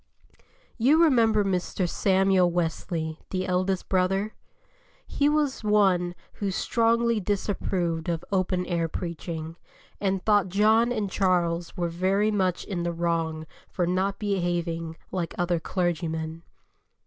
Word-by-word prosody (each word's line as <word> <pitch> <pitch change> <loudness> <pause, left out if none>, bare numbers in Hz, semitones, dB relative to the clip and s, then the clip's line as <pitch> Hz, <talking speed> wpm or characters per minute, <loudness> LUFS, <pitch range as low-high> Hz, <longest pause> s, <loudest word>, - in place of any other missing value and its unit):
You 295 +8 +5
remember 225 -8 +4
Mr. 185 -1 -1
Samuel 190 0 +3
Wesley, 165 -2 -2
the 185 -1 -2
eldest 185 0 0
brother? 195 +3 +1 0.7
He 285 0 +1
was 295 -5 0
one 190 -4 +2 0.2
who 200 - -3
strongly 230 +3 +1
disapproved 185 -4 -1
of 170 0 -2
open 185 -1 0
air 170 -2 0
preaching, 165 -1 -5 0.4
and 195 -2 -1
thought 205 -3 +3
John 220 +5 +3
and 210 -5 -2
Charles 175 -3 0
were 175 -1 0
very 190 +5 +1
much 185 -4 0
in 185 -4 -4
the 170 0 -1
wrong 165 -2 -1 0.2
for 180 - -1
not 190 +3 0
behaving 175 -5 -2
like 175 -3 -3
other 175 -2 +1
clergymen. 165 -2 -2
185 Hz, 125 wpm, -26 LUFS, 170-205 Hz, 0.7 s, You